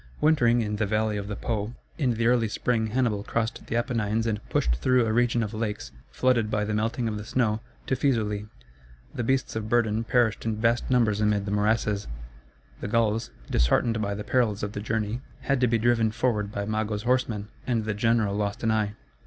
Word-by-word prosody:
Wintering 120 -6 +4
in 105 -1 -2
the 105 -1 0
valley 110 +1 0
of 100 -1 -4
the 105 - -4
Po, 110 +1 -3 0.2
in 125 -6 +1
the 115 +1 0
early 120 -1 +3
spring 110 +1 0
Hannibal 110 -3 0
crossed 115 +1 -2
the - - -2
Apennines 115 -2 0
and 110 -2 -1
pushed - - +1
through 125 - +3
a 110 - 0
region 120 0 +2
of 105 +1 -5
lakes, 110 -1 -3 0.2
flooded 120 -4 +2
by 105 -1 0
the 105 - -2
melting 115 +3 0
of 110 -1 -2
the - - -6
snow, 110 -1 0 0.3
to 130 - 0
Fæsulæ. 110 -6 0 0.6
The 120 - -2
beasts 130 +1 0
of 110 -1 -3
burden 115 -2 +2
perished 115 -2 +1
in 110 -1 -1
vast 115 +2 +1
numbers 115 -5 +2
amid 105 -1 +2
the 100 - -3
morasses; 105 0 +1 0.7
the - - -4
Gauls, 115 +1 +1 0.2
disheartened 110 - +2
by 100 -1 -1
the 105 - -5
perils 110 -6 +1
of 105 - -2
the 105 - -5
journey, 110 +2 -2 0.2
had 140 -2 0
to 125 - +5
be 115 0 +2
driven 115 0 +3
forward 110 -2 0
by 100 -1 -3
Mago's 110 0 -2
horsemen, 120 -4 0 0.2
and 115 -4 0
the 110 - -1
general 110 -1 +1
lost 105 +2 -2
an 110 - +2
eye. 105 -1 0
110 Hz, 200 wpm, -26 LUFS, 105-120 Hz, 0.7 s, to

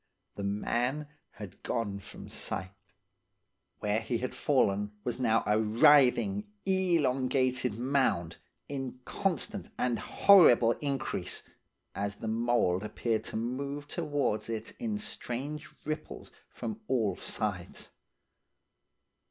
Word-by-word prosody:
The - - -5
man 120 +8 -1 0.2
had 100 -2 -10
gone 100 -4 -2
from - - -10
sight. 95 -1 -4 1.1
Where 105 0 +1
he 115 +2 -1
had 125 +2 -3
fallen 105 -7 +1
was 120 0 -2
now 115 -3 +3
a 105 +1 +3
writhing, 145 - +4 0.2
elongated 130 - +2
mound, 120 - +1 0.3
in 135 -3 -5
constant 200 +1 -1
and 120 -2 0
horrible 155 -13 +6
increase, 140 -3 -2 0.5
as 100 +1 -2
the 110 - -6
mould 110 -5 +2
appeared 110 +1 -1
to - - -5
move 140 +5 -3
towards 145 -10 -1
it 110 -1 -4
in 225 -3 -2
strange 150 - -4 0.2
ripples 155 +1 -5 0.2
from 220 0 -6
all 115 -6 +1
sides. 95 -4 -3
125 Hz, 110 wpm, -30 LUFS, 110-145 Hz, 1.1 s, horrible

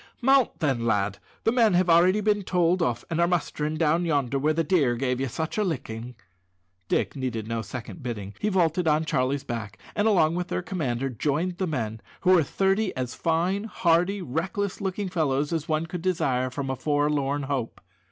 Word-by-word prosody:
"Mount 265 -3 +3
then, 135 -6 +1
lad; 105 -3 0 0.2
the 225 - +3
men 230 -6 +4
have 180 +1 +3
already 180 +5 +5
been 210 0 +2
told 180 -1 +1
off, 120 -8 -1
and 165 +1 +1
are 170 - +4
mustering 155 -3 -1
down 165 +2 +2
yonder 140 -5 0
where 150 +3 +2
the 165 +1 +1
deer 145 -7 +2
gave 125 +1 -1
you 135 - 0
such 160 - -3
a - - +3
licking." 125 - -4 0.7
Dick - - 0
needed 120 -5 -3
no 115 0 -2
second 120 - -8
bidding. 105 -5 -5
He 210 - 0
vaulted 180 -3 +1
on 155 +1 +3
Charlie's 135 -2 0
back, 110 -3 -5 0.2
and 205 +1 +2
along 165 -7 +4
with 180 0 -2
their 180 - -2
commander 135 -8 -2
joined 155 - -1
the 190 - 0
men, 115 -8 -3 0.2
who 185 - +4
were 180 -3 +6
thirty 195 +4 0
as 125 -1 -3
fine, 180 +5 0
hardy, 180 0 +1
reckless 180 +8 -2
looking 195 +1 -2
fellows 150 -4 0
as 165 0 -2
one 155 +1 +1
could 175 +1 -6
desire 135 -8 0
for 130 +3 -5
a - - -2
forlorn 145 -1 0
hope. 135 -4 -3
155 Hz, 190 wpm, -26 LUFS, 130-180 Hz, 0.7 s, were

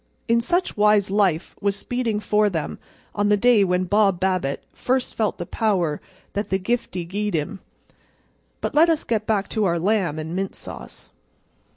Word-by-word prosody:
In 235 0 +3
such 350 +10 0
wise 210 -2 +3
life 190 -5 +1
was 200 -1 +1
speeding 230 0 -2
for 210 0 +2
them 165 -5 -4 0.3
on 205 0 +1
the 210 - +4
day 235 -1 +5
when 180 -1 +1
Bob 195 -1 +2
Babbitt 185 -7 -1
first 255 0 -1
felt 215 -3 -1
the 175 - -5
power 180 -8 0 0.3
that 205 0 -2
the 190 - +2
giftie 190 -4 -2
gi'ed 205 +1 -2
him. 160 +6 -3 1.0
But - - -2
let 320 +3 +5
us 320 -2 +1
get 215 -2 -1
back 210 -3 +1
to 215 -2 0
our 170 -2 +1
lamb 185 -3 +1
and 160 +2 -5
mint 195 +1 -3
sauce. - - -10
205 Hz, 175 wpm, -23 LUFS, 185-220 Hz, 1.0 s, day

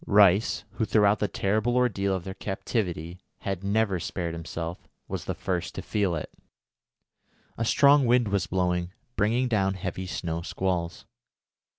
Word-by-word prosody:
Rice, 100 +1 +5
who 110 - -1
throughout 105 -1 +4
the 105 - +1
terrible 110 +6 0
ordeal 100 -6 +2
of 95 - -4
their 95 - -5
captivity 90 -4 -3 0.2
had 95 -1 -3
never 100 -2 +1
spared 85 0 -3
himself, 85 +1 -6 0.2
was - - -4
the - - -2
first 90 -3 -3
to - - -5
feel 100 -5 0
it. 75 - -5 1.2
A 115 - -2
strong 140 +2 +5
wind 120 -2 +4
was 100 -1 0
blowing, 90 -1 0 0.2
bringing 115 +5 +2
down 100 -5 +1
heavy 95 0 -4
snow 85 -2 -3
squalls. 85 -1 -2
95 Hz, 150 wpm, -27 LUFS, 90-110 Hz, 1.2 s, Rice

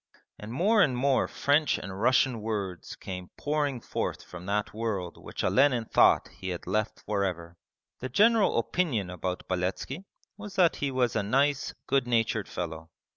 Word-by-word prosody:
And 105 +1 -8
more 205 - +3
and 130 -8 +3
more 135 +1 +2
French 145 +3 +2
and 95 0 -7
Russian 125 -1 +3
words 100 -5 -4
came 90 -1 -7
pouring 145 -3 -1
forth - - -3
from 90 +1 -10
that 105 +1 -1
world 105 -6 -3
which - - -5
Olenin 130 -4 +3
thought - - +4
he 95 - -7
had 90 -2 -5
left 105 +3 -1
for 100 -1 0
ever. 85 -2 -4 0.4
The 130 - -4
general 215 - +4
opinion 115 - 0
about 90 +1 -4
Beletski 95 - -3 0.3
was 205 -2 -9
that 180 -4 +4
he 140 - -1
was 130 -3 0
a 110 - +2
nice, 135 +7 +1
good 135 -2 +1
natured 115 -3 +1
fellow. 80 -2 -5
115 Hz, 165 wpm, -28 LUFS, 95-140 Hz, 0.4 s, thought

